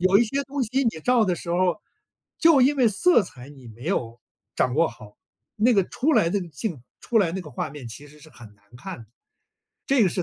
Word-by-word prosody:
有 185 +2 +5
一 235 - +4
些 275 +5 -2
东 280 0 -3
西 255 +4 0
你 - - +4
照 245 +5 +3
的 185 -3 0
时 170 - -10
候， 180 +2 +1 0.6
就 325 -4 +5
因 275 +3 +4
为 250 -4 +4
色 235 - +3
彩 135 -8 -11
你 135 -4 -14
没 115 +3 -13
有 120 -9 -2 0.4
掌 125 - +1
握 165 +2 +3
好， 105 -1 -14 0.4
那 230 +4 +3
个 200 -4 +3
出 300 +5 0
来 165 - +4
那 200 +2 0
个 175 - -7
镜 160 - -5 0.2
出 235 - +1
来 170 -6 +2
那 190 - -3
个 155 -4 -10
画 125 - -4
面 145 -4 -9
其 115 +6 -10
实 150 +1 -18
是 150 - -16
很 115 -6 -14
难 100 - -32
看 185 +5 -8
的， 115 - -14 0.8
这 270 -3 +3
个 195 - +4
是 180 - -2
180 Hz, 260 characters per minute, -24 LUFS, 140-235 Hz, 0.8 s, 有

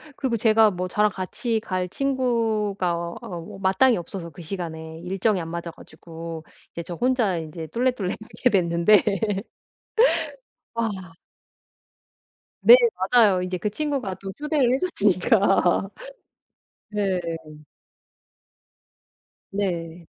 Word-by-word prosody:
그리고 255 -5 -1
제가 220 -1 +5
뭐 180 0 -3
저랑 210 +3 +2
같이 220 +5 -2
갈 185 -4 -3
친구가 225 -8 0
어 170 0 -4
뭐 175 +1 -8
마땅히 195 +6 +3
없어서 170 0 -6
그 165 +2 -12
시간에 160 -2 -6
일정이 190 +2 0
안 165 - -6
맞아 170 0 -5
가지고 165 -1 -10 0.3
이제 170 - -6
저 175 - -7
혼자 240 -3 +1
인제 160 0 -6
쫄래쫄래 235 - -1
가게 240 +3 -1
됐는데 175 +1 +4 1.7
아. 230 -1 0 1.7
네 485 - +11 0.4
맞아요. 210 -7 +5
인제 185 0 -3
그 205 +4 -2
친구가 275 -7 -2
또 195 0 -5
초대를 295 -4 +1
해줬으니까. 200 - +2 1.0
네. 200 -3 0 2.3
네. 175 -4 -3
195 Hz, 215 characters per minute, -24 LUFS, 170-225 Hz, 2.3 s, 네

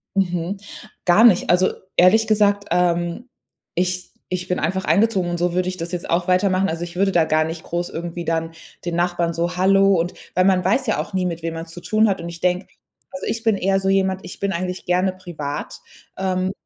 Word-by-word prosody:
Mhm. 180 0 0 0.5
Gar 185 +5 +5
nicht. 200 -7 +5
Also 180 +1 +4 0.2
ehrlich 220 +5 +5
gesagt, 205 -1 +2
ähm, 175 +6 0 0.5
ich 180 +1 -1 0.2
ich 180 0 -3
bin 180 - 0
einfach 190 +1 -1
eingezogen, 200 -4 +2
und 175 - -2
so 175 0 0
würde 185 0 0
ich 185 - -5
das 170 +1 -5
jetzt 175 - -4
auch 175 +2 +1
weitermachen. 185 +1 +2
Also, 165 0 -3
ich 175 0 -8
würde 195 0 +2
da 170 - +4
gar 155 0 +2
nicht 160 0 -6
groß 175 +1 -3
irgendwie 170 +1 -5
dann 165 0 -1 0.3
den 175 -1 -3
Nachbarn 175 -1 0
so 170 +2 -2
„hallo“ 195 +1 +4
und 170 +2 -1 0.2
weil 185 - +4
man 185 -2 +3
weiß 225 +8 +2
ja 215 - +1
auch - - -5
nie, 185 -1 0
mit 170 -2 -4
wem 165 - -2
man's 165 0 -7
zu 175 - -9
tun 215 +4 +2
hat. 195 - -1
Und 170 - -6
ich 170 0 -9
denke 180 +1 0 0.4
also, 275 - -6
ich 230 - -2
bin 225 -2 +3
eher 195 0 +1
so 195 - -3
jemand 190 -1 +1
ich - - -9
bin 200 0 0
eigentlich 180 +1 -3
gerne 180 +1 +1
privat. 155 -6 -6 0.4
Ähm, 185 0 -1
180 Hz, 220 wpm, -21 LUFS, 170-195 Hz, 0.5 s, Gar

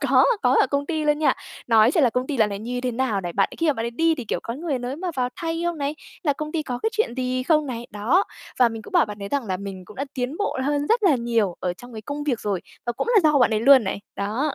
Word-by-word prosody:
Có, - - +4 0.2
có 250 0 +4
ở - - +4
công 280 +2 -1
ty 315 -1 -1
luôn 295 0 +2
nha. 310 - +3 0.3
Nói 225 -1 +5
chuyện 315 - +4
là 245 - +4
công 250 +3 -1
ty 290 - -2
dạo 220 -3 +3
này 200 -1 -4
như 245 +4 -4
thế 250 0 -1
nào 235 -4 0
này. 175 -2 -5
Bạn 195 +3 +2
ấy - - -9
khi 330 - +2
mà 300 - +4
bạn 225 -4 -4
ấy 235 - -2
đi 325 +6 +2
thì, 255 - -6
kiểu, - - -2
có 230 - -4
người 295 -1 -2
nới 250 +3 -4
mà 365 +1 -3
vào 250 -1 +1
thay 330 0 -3
không 345 -2 -1
này, 285 +1 -1 0.3
là 300 -5 +2
công 305 +2 -6
ty 320 - -1
có 250 -4 -4
cái 445 - +1
chuyện 435 - 0
gì 255 0 -1
không 305 +2 +2
này, 240 -2 -5
đó. 235 - +2 0.3
Và 250 -2 +6
mình 225 -1 -7
cũng - - -13
bảo - - +4
bạn 210 0 -8
ấy 200 - -4
rằng 280 +1 -1
là 185 -2 -1
mình 190 -1 -7
cũng 210 - -14
đã 275 - -2
tiến 255 +3 -3
bộ 410 -8 -2
hơn 290 +1 0
rất 455 +4 +2
là 325 -9 +5
nhiều 230 -6 0
ở 180 - -1
trong 245 +6 -13
cái 220 -1 -7
công 290 +4 -5
việc 255 -6 0
rồi, 200 -4 -1 0.3
và 240 - 0
cũng 240 - -3
là 425 - +7
do 290 - +3
bạn 245 - +4
ấy 215 -1 +1
luôn 265 -1 +7
này. 190 +1 -3 0.2
Đó. 230 +9 -1
255 Hz, 320 wpm, -23 LUFS, 225-295 Hz, 0.3 s, là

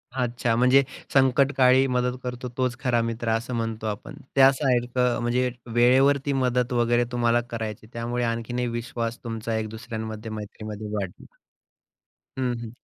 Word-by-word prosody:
अच्छा 120 -2 0
म्हणजे, 125 +3 +5 0.3
संकटकाळी 135 -1 +4
मदत 125 0 0
करतो 125 0 -5
तोच 125 -2 0
खरा 125 -4 +1
मित्रं 115 0 -2
असं 125 +3 -6
म्हणतो 115 -1 -3
आपण. 110 +8 -5 0.2
त्या 135 0 +8
सारखं 125 -2 +1
म्हणजे 125 +2 +1 0.2
वेळेवरती 135 +4 +4
मदत 125 -2 +1
वगैरे 120 0 +3
तुम्हाला 120 -1 +2
करायची 110 -2 -5
आहे. 110 - -20
त्यामुळे 120 +1 -2
आणखीन 115 +1 -2
एक 125 -1 0
विश्वास 115 0 -3
तुमचा 115 -1 -3
एक 110 0 -1
दुसऱ्यांमध्ये 110 -1 -6
मैत्रीमध्ये 110 0 -7
वाढला. 95 -4 -5 1.2
हं, 125 -1 +1
हं. 115 - -6
120 Hz, 145 wpm, -25 LUFS, 115-125 Hz, 1.2 s, त्या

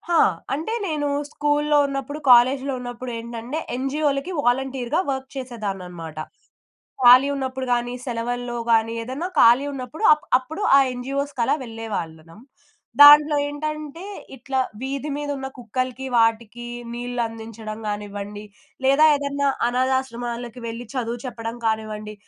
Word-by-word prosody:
ఆ! - - +5 0.4
అంటే 320 +11 -3
నేను 300 -3 -1 0.2
స్కూల్లో 295 0 +1
ఉన్నప్పుడు 275 +2 -4
కాలేజ్‌లో 260 +3 +5
ఉన్నప్పుడేంటంటే 240 +1 -6 0.2
ఎన్‌జీఓలకి 275 +4 -1
వాలంటీర్‌గా 265 +3 0
వర్క్ 265 0 -4
చేసేదాన్ననమాట. 195 - -6 0.9
ఖాళీ 250 +3 +8
ఉన్నప్పుడు 265 -1 -3
గాని, 240 0 -1
సెలవుల్లో 245 0 -3
గాని 225 0 +3
ఏదైనా 265 +9 -4
ఖాళీ 240 +4 +6
ఉన్నప్పుడు 270 - -7
అ - - +2 0.2
అప్పుడు 315 +9 -8 0.2
ఆ - - +7
ఎన్‌జీఓస్‌కలా 275 +1 -1
వెళ్ళేవాళ్ళం. 205 -8 -6 0.6
దాంట్లో 295 +1 +9
ఏంటంటే 305 +2 -5 0.3
ఇట్లా 265 +1 -3 0.2
వీధి 275 +2 -3
మీద 290 0 -4
ఉన్న 265 0 -5
కుక్కలకి, 255 +1 -4
వాటికి 230 +1 +1 0.3
నీళ్లందించడం 225 -3 -5
కానివ్వండి. 205 0 -5 0.4
లేదా 275 +3 +5
ఏదైనా 280 0 -1 0.2
అనాధాశ్రమాలకు 245 -1 -2
వెళ్లి 230 +2 -6
చదువు 240 -2 -3
చెప్పడం 230 -1 -5
కానివ్వండి. 215 -1 -2
250 Hz, 110 wpm, -23 LUFS, 230-275 Hz, 0.9 s, దాంట్లో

